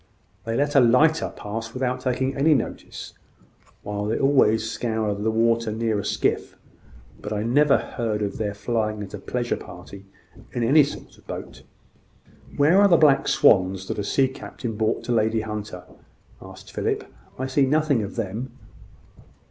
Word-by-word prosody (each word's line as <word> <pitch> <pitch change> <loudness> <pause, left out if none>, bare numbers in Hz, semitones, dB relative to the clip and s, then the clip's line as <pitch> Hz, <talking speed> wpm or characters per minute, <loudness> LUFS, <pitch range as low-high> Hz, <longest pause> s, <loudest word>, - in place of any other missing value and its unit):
They 115 0 -2
let 145 +3 0
a 140 - +6
lighter 140 +7 +4
pass 115 +3 -6
without 125 0 -1
taking 130 +1 -1
any 150 +3 +4
notice, 125 - -5 0.7
while 105 0 -3
they 110 - -1
always 110 -5 +3
scour 110 -2 -2
the 105 +2 -2
water 115 0 +1
near 110 -1 -1
a - - -4
skiff; - - -1 0.6
but - - -6
I 105 0 -1
never 140 +5 +4
heard 110 -3 -3
of 100 +1 -4
their 105 -2 -2
flying 110 -1 -2
at 95 - -10
a 105 - -6
pleasure 120 +4 -2
party 95 +3 -12 0.5
in 120 - -1
any 145 +6 +6
sort 140 - -8
of - - -25
boat." - - -7 1.0
"Where 160 +7 +5
are 205 - +7
the 175 -3 +5
black 145 -4 +4
swans 95 -1 +3
that - - -3
a - - -1
sea 135 +6 +2
captain 125 -3 -7
brought 110 +1 -1
to - - -4
Lady 110 -1 +2
Hunter?" 105 -4 -6 0.6
asked - - -12
Philip. - - -1 0.3
"I 130 - -3
see 135 +1 +2
nothing 150 -3 +2
of 100 0 -6
them." 115 +4 -5
115 Hz, 165 wpm, -24 LUFS, 105-130 Hz, 1.0 s, are